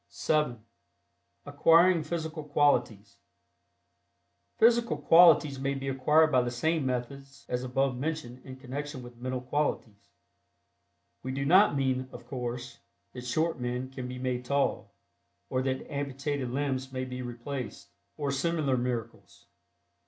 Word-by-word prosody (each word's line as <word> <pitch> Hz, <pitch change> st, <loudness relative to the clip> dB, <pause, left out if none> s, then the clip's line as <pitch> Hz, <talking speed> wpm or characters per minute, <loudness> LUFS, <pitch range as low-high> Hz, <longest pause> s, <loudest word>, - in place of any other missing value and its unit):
(7) 135 Hz, -8 st, -1 dB, 0.8 s
ACQUIRING 165 Hz, +4 st, +4 dB
PHYSICAL 160 Hz, 0 st, -4 dB
QUALITIES. 140 Hz, -8 st, +1 dB, 1.4 s
Physical 235 Hz, -6 st, +4 dB
qualities 155 Hz, -3 st, +6 dB
may 140 Hz, +1 st, -1 dB
be 135 Hz, 0 st, -5 dB
acquired 150 Hz, +4 st, +3 dB
by 130 Hz, -, +4 dB
the 120 Hz, -, -2 dB
same 145 Hz, +4 st, 0 dB
methods 135 Hz, +2 st, -5 dB
as 125 Hz, 0 st, -2 dB
above 130 Hz, +1 st, 0 dB
mentioned 130 Hz, -3 st, -4 dB
in 130 Hz, -, -9 dB
connection 130 Hz, +1 st, -6 dB
with 120 Hz, -1 st, -12 dB
mental 130 Hz, +1 st, -4 dB
qualities. 125 Hz, -6 st, -3 dB, 1.1 s
We 130 Hz, -, -4 dB
do 140 Hz, +1 st, -2 dB
not 185 Hz, +2 st, +5 dB
mean, 130 Hz, -1 st, 0 dB
of -, -, -11 dB
course, 125 Hz, -1 st, -5 dB, 0.3 s
that 125 Hz, -1 st, -8 dB
short 160 Hz, +4 st, 0 dB
men 125 Hz, +1 st, -3 dB
can 130 Hz, -1 st, -6 dB
be 125 Hz, 0 st, -6 dB
made 125 Hz, -1 st, -2 dB
tall, 140 Hz, +2 st, 0 dB, 0.6 s
or 130 Hz, -, +1 dB
that 130 Hz, 0 st, -2 dB
amputated 140 Hz, -1 st, -3 dB
limbs 130 Hz, 0 st, -2 dB
may 130 Hz, 0 st, -3 dB
be 125 Hz, 0 st, -6 dB
replaced, 125 Hz, +1 st, -6 dB, 0.3 s
or 145 Hz, -2 st, -1 dB
similar 145 Hz, -2 st, 0 dB
miracles. 120 Hz, -2 st, -5 dB
135 Hz, 130 wpm, -29 LUFS, 125-145 Hz, 1.4 s, qualities